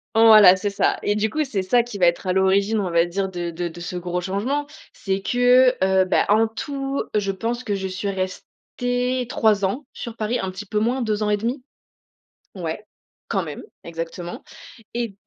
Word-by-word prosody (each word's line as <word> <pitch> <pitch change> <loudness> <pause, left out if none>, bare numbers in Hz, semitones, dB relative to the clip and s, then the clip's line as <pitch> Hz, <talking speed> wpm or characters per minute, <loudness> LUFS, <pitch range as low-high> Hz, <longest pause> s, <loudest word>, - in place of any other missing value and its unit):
voilà, 215 -4 +8
c'est 195 +2 -2
ça, 200 - +1
et 205 - +1
du 215 +1 0
coup, 310 +6 0
c'est 215 -9 -2
ça 235 +6 +3
qui 235 -4 -8
va 180 -3 +4
être 170 +3 0
à 180 - +2
l'origine, 195 +3 +2
on 190 -3 -1
va 170 0 +3
dire, 190 +2 -2
de 175 -2 -4
de 175 +1 -3
de 170 +1 -10
ce 175 +1 -6
gros 180 0 -3
changement 225 +11 -2 0.3
c'est 195 0 -3
que, 250 +2 +4
heu, 190 0 +3
bah, - - +2
en 220 +2 +4
tout, 275 +4 -4 0.2
heu, - - +4
je 195 -1 -1
pense 235 +5 -3
que 205 -4 -1
je 190 -1 -3
suis 190 +2 -4
restée 245 +6 -3
3 210 -2 +2
ans 250 +10 -3
sur 235 -2 -7
Paris, 220 +3 -1
un 190 - -3
petit 205 +3 -8
peu 210 +1 -1
moins, 245 +4 0
2 215 -2 -1
ans 210 - +1
et 210 - +2
1/2. 240 +5 -3 0.9
Ouais, 175 +3 -5 0.4
quand 190 -2 -1
même, 150 -3 -7 0.2
exactement 170 +1 -6 0.5
et 235 -4 -3
205 Hz, 205 wpm, -22 LUFS, 185-235 Hz, 0.9 s, voilà